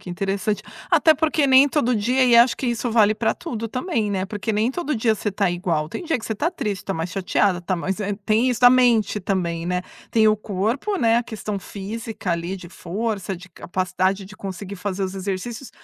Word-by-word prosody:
que 180 - -9
interessante. 195 +3 -2 0.3
Até 320 -2 +5
porque 305 -1 +1
nem 265 +2 +7
todo 255 -4 +1
dia, 250 +5 +2
e 240 -1 +4
acho 235 +1 +6
que 265 - -3
isso 240 0 -1
vale 215 -2 +4
pra 220 +1 +1
tudo 230 -9 -5
também, 235 - -1
né, 190 -1 -1
porque 210 +2 -3
nem 215 +2 +2
todo 300 -2 -2
dia 220 0 +2
você 210 0 -3
tá 195 -1 +1
igual. 175 -3 -1
Tem 355 - -6
dia 325 -5 0
que 220 - -9
você 220 - -2
tá 310 +11 0
triste, 210 - -4
tá 195 - -2
mais 165 +1 -3
chateada, 190 -1 +1
tá 185 +1 -2
mais 190 +2 -2 0.3
tem 220 +4 +3
isso 245 - -2
da 245 - +9
mente 240 -5 +3
também, 175 -3 -1
né. 180 +1 -1 0.3
Tem 220 -1 +4
o 215 0 +4
corpo, 220 - -2
né, 230 -5 +3
a 240 - -1
questão 215 -3 -5
física 210 0 -5
ali 170 +3 -3
de 180 -2 -11
força, 195 +2 -3
de 180 +1 -13
capacidade 185 +2 -1
de 200 +2 -12
conseguir 195 +1 -6
fazer 195 0 -3
os 190 0 -5
exercícios, 200 +6 -4
210 Hz, 215 wpm, -22 LUFS, 190-240 Hz, 0.3 s, da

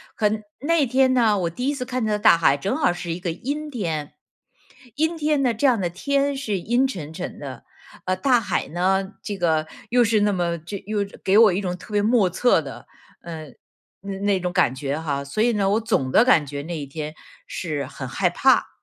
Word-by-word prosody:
和 210 -2 +2 0.3
那 305 +1 +2
天 260 +1 +3
呢， 225 -5 +3
我 170 -2 0
第 245 +10 -4
一 290 - +1
次 255 -2 -4
看 250 -3 -2 0.2
大 210 -6 +7
海 140 -4 +3
正 200 - -2
好 290 - +2
是 175 -1 -5
一 175 - -6
个 175 -2 -2
阴 290 - -4
天， 160 - -3 0.8
阴 320 +3 0
天 300 -2 +1
呢， 240 -2 +2
这 250 +6 -1
样 240 -5 +3
的 175 -2 -1
天 280 +9 0
是 215 -8 -2
阴 240 +8 +1
沉 160 - -7
沉 180 - -6
的， 135 -4 -8 0.4
呃， 185 0 +1
大 245 +5 +3
海 - - -2
呢， 190 +3 0
这 205 -2 -4
个 160 -3 +1 0.2
又 245 0 +4
是 220 -2 +2
那 205 -1 +2
么 170 -2 -1
这 175 +6 -7
又 215 -1 -1 0.2
给 195 +2 +3
我 220 -5 +7
一 195 - -1
种 180 -1 -3
特 210 +4 -12
别 205 - +3
莫 215 -3 +3
测 245 +8 +3
的， - - -9 0.4
呃， 160 -2 -8 0.5
那 195 -1 -6
那 200 -2 +1
种 180 -1 -2
感 175 -8 +2
觉 140 +2 -3
哈。 140 -3 -2
所 140 +10 -3
以 240 +1 +3
呢， 200 -2 +1
我 215 +3 +2
总 140 - 0
的 225 - +5
感 165 - +4
觉 140 0 -5
那 170 0 -5
一 145 - -5
天 150 +2 -6 0.3
是 150 -6 -3
很 130 0 -8
害 180 +7 +1
怕。 265 +9 +3
195 Hz, 235 characters per minute, -23 LUFS, 165-245 Hz, 0.8 s, 大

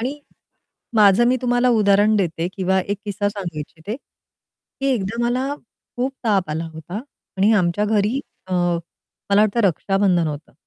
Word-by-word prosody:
आणि 270 +5 -3 0.8
माझं 210 +1 +6
मी 255 - +3
तुम्हाला 245 0 +2
उदाहरण 210 -1 +4
देते 170 -3 -1
किंवा 190 0 +1
एक 200 +2 -3
किस्सा 205 0 -1
सांगू 185 -6 -5
इच्छिते. 165 - -6 0.8
की 275 - 0
एकदा 225 +2 -2
मला 255 +3 0
खूप 250 +2 -6
ताप 195 -7 +1
आला 160 +2 -2
होता 160 +4 -8 0.4
आणि 205 +4 +4
आमच्या 185 +1 +2
घरी 215 +4 +1 0.3
अ, 185 - -6
मला 175 +3 -1
वाटतं 215 +2 +2
रक्षाबंधन 195 -2 +2
होतं. 150 +1 -7
200 Hz, 145 wpm, -21 LUFS, 180-225 Hz, 0.8 s, माझं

